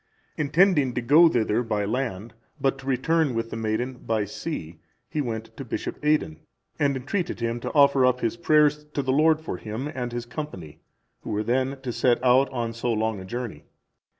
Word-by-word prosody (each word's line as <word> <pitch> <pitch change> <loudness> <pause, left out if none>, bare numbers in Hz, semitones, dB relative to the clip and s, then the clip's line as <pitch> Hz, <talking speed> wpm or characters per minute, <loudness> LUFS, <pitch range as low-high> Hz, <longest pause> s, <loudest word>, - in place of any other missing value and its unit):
Intending 150 -3 +3
to 120 - 0
go 155 +8 +6
thither 115 -4 +1
by 105 -3 -1
land, 115 -2 -3 0.3
but 135 0 0
to 135 - -11
return 140 +1 +1
with 115 0 -2
the - - -4
maiden 115 +3 -2
by 110 -2 -1
sea, 95 - -6 0.3
he 150 - -2
went 115 -4 -5
to 135 - -5
Bishop 130 - -5
Aidan, 150 - +1 0.4
and 140 -2 +2
entreated 170 +7 -3
him 115 0 -2
to - - -4
offer 140 -2 +5
up 125 0 +3
his 115 -1 0
prayers 150 +2 +3
to 140 - 0
the 130 0 +1
Lord 155 +2 +4
for 160 - -5
him 110 +6 -5
and 125 -2 -4
his 120 0 -4
company, 120 - -7 0.4
who - - -9
were 105 0 -1
then 130 +4 0
to 125 -3 -4
set 120 0 +3
out 130 +2 +4
on 120 -3 -3
so 120 +1 -2
long 110 -2 -1
a 95 - -8
journey. 120 +3 -6
125 Hz, 195 wpm, -25 LUFS, 115-145 Hz, 0.4 s, go